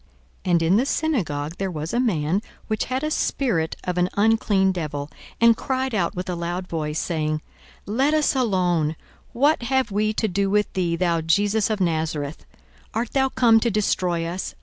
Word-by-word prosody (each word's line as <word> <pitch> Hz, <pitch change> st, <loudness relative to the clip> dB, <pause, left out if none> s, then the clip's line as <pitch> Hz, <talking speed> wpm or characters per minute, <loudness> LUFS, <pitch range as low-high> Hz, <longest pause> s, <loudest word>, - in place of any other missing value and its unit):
42:004:033 180 Hz, -, 0 dB
And 170 Hz, -, +4 dB
in 175 Hz, +5 st, +4 dB
the 250 Hz, -, +2 dB
synagogue 170 Hz, -, -1 dB
there 195 Hz, -1 st, -1 dB
was 155 Hz, -2 st, -5 dB
a 240 Hz, -, +1 dB
man, 185 Hz, -6 st, +1 dB, 0.2 s
which 215 Hz, -1 st, -1 dB
had 260 Hz, +3 st, -2 dB
a 305 Hz, -, -1 dB
spirit 220 Hz, -, 0 dB
of 180 Hz, -1 st, -2 dB
an 180 Hz, +1 st, +2 dB
unclean 205 Hz, -2 st, +3 dB
devil, 150 Hz, -5 st, -4 dB, 0.3 s
and 230 Hz, 0 st, +6 dB
cried 260 Hz, +1 st, -2 dB
out 195 Hz, -1 st, 0 dB
with 180 Hz, +1 st, -4 dB
a 180 Hz, -, -2 dB
loud 175 Hz, +2 st, -3 dB
voice, 155 Hz, -2 st, -2 dB
42:004:034 -, -, -3 dB
Saying, 155 Hz, -2 st, -1 dB, 0.4 s
Let 265 Hz, +9 st, +1 dB
us 305 Hz, -2 st, +2 dB
alone; 180 Hz, -, +1 dB, 0.4 s
what 285 Hz, +5 st, +2 dB
have 260 Hz, -1 st, 0 dB
we 215 Hz, +2 st, +1 dB
to 220 Hz, -, 0 dB
do 195 Hz, +1 st, 0 dB
with 210 Hz, +1 st, +1 dB
thee, 175 Hz, -3 st, 0 dB
thou 170 Hz, -1 st, +1 dB
Jesus 205 Hz, +7 st, +2 dB
of 215 Hz, -2 st, -1 dB
Nazareth? 160 Hz, -4 st, -2 dB, 0.5 s
art 230 Hz, +1 st, -1 dB
thou 265 Hz, -1 st, +2 dB
come 230 Hz, -3 st, +4 dB
to 235 Hz, -, +1 dB
destroy 180 Hz, -5 st, 0 dB
us? 175 Hz, +3 st, -4 dB
190 Hz, 190 wpm, -23 LUFS, 165-230 Hz, 0.5 s, and